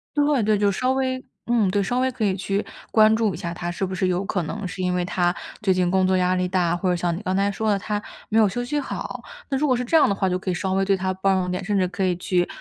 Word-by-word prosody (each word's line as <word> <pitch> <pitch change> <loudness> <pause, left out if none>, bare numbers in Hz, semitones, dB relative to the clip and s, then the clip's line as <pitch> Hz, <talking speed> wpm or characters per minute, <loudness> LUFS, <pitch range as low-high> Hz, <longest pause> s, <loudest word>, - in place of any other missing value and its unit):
对 290 -3 +3
对， 215 0 +3
就 200 0 +2
稍 255 +6 0
微 260 -1 -1 0.2
嗯， 230 -5 +3
对， 200 +1 +1
稍 245 +6 -1
微 260 0 +2
可 230 -3 -4
以 190 -2 +2
去 195 +2 -2 0.2
关 220 0 +5
注 220 -4 +1
一 - - -6
下 170 -2 -4
他， 175 0 -4
是 185 +2 -2
不 185 - -5
是 185 0 0
有 180 +2 0
可 190 -3 -1
能 205 +5 -5
是 185 +1 -5
因 180 0 0
为 180 - 0
他 175 0 0 0.3
最 190 -3 +3
近 180 -1 +1
工 190 -1 +3
作 190 - +2
压 180 0 +2
力 180 0 0
大， 175 -2 +1
或 180 +1 -1
者 180 - +2
像 170 -1 -1
你 190 - -6
刚 185 -2 -1
才 200 +1 +2
说 220 +2 -1
的， 200 - +3
他 210 +1 -3 0.3
没 225 +1 +3
有 215 - +6
休 245 +6 -3
息 295 +4 -1
好。 - - -5 0.3
那 270 - 0
如 300 +2 +1
果 255 - +3
是 250 - -1
这 320 +6 +3
样 300 - +5
的 200 - +1
话， 190 -2 0
就 180 0 -1
可 190 - -4
以 - - +1
稍 190 +1 -2
微 195 0 +1
对 195 0 +3
他 185 0 -1
包 195 +1 +2
容 180 -1 -1
点， 180 - -2
甚 205 -1 0
至 185 - +3
可 185 +1 -6
以 180 -1 +1
去 175 0 0
195 Hz, 340 characters per minute, -23 LUFS, 180-215 Hz, 0.3 s, 有